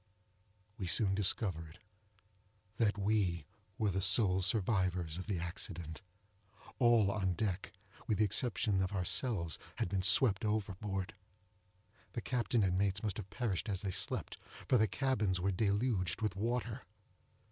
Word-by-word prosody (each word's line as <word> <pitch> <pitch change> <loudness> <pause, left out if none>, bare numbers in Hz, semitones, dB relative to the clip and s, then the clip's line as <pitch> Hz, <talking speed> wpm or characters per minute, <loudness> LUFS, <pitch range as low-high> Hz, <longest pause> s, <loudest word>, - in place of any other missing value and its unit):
We 95 - -3
soon 95 +4 +3
discovered 90 -5 -1 1.0
that 105 -2 +1
we 95 -6 0 0.3
were 105 -4 +1
the 95 +1 -1
sole 95 0 +4
survivors 95 -5 0
of 95 - -7
the 100 -4 -1
accident. 85 -1 -4 0.8
All 120 -5 +4
on 95 -3 0
deck, 95 -1 -3 0.4
with 110 - +1
the 110 - +3
exception 105 -2 +1
of 95 +1 -2
ourselves, 95 - -1 0.2
had - - -2
been 95 0 0
swept 100 +1 +5
overboard;—the 100 0 -6
captain 120 -3 0
and 90 -1 +1
mates 100 +1 0
must 105 -3 -2
have 100 -3 -7
perished 115 -4 -2
as 95 -2 -1
they 100 - -2
slept, - - -3 0.3
for 125 - +4
the 110 - +4
cabins 105 -5 0
were 95 +2 0
deluged 100 -1 0
with 105 -4 -1
water. 120 +3 -2
100 Hz, 135 wpm, -34 LUFS, 95-110 Hz, 1.0 s, swept